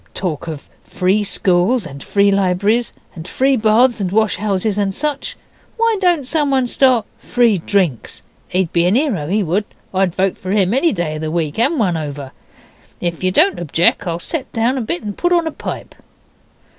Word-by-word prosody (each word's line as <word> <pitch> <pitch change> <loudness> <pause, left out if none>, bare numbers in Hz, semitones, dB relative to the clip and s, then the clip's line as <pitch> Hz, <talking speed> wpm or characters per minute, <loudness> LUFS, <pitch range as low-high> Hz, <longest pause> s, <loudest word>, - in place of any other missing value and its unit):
Talk 170 -5 -3
of 155 -3 -7 0.2
free 190 +3 0
schools 195 +3 +1
and 140 0 -9
free 200 0 +2
libraries, 200 +4 +1 0.2
and 165 0 -9
free 265 +7 +2
baths 230 +2 +3
and 185 -3 -2
wash 220 -1 +1
houses 205 +1 -1
and 195 -2 -1
such! 295 -1 -3 0.4
Why 460 -1 +2
don't 350 -7 +2
someone 275 -3 +1
start 250 -3 +2
free 235 -5 +2
DRINKS? 170 - -1 0.2
He'd 180 -2 -1
be 170 0 +3
a - - +2
'ero, 225 - 0
he 205 +5 +1
would. 190 +5 0 0.3
I'd 185 -2 +1
vote 190 0 0
for 185 - -7
him 195 0 +2
any 275 +6 +2
day 165 -5 -3
of - - -7
the 155 - -3
week 160 +1 -2
and 280 +8 +2
one 185 -8 +1
over. 145 -3 -6 0.7
Ef 175 0 -3
yer 185 - +3
don't 320 - +3
objec 170 +2 +1
I'll 165 -1 -1
set 265 - -4
down 230 +3 +1
a 260 - -2
bit 195 -5 -3
and 205 -2 -5
put 350 - 0
on 340 -2 +3
a 320 - -2
pipe. - - -7
200 Hz, 190 wpm, -18 LUFS, 175-250 Hz, 0.7 s, baths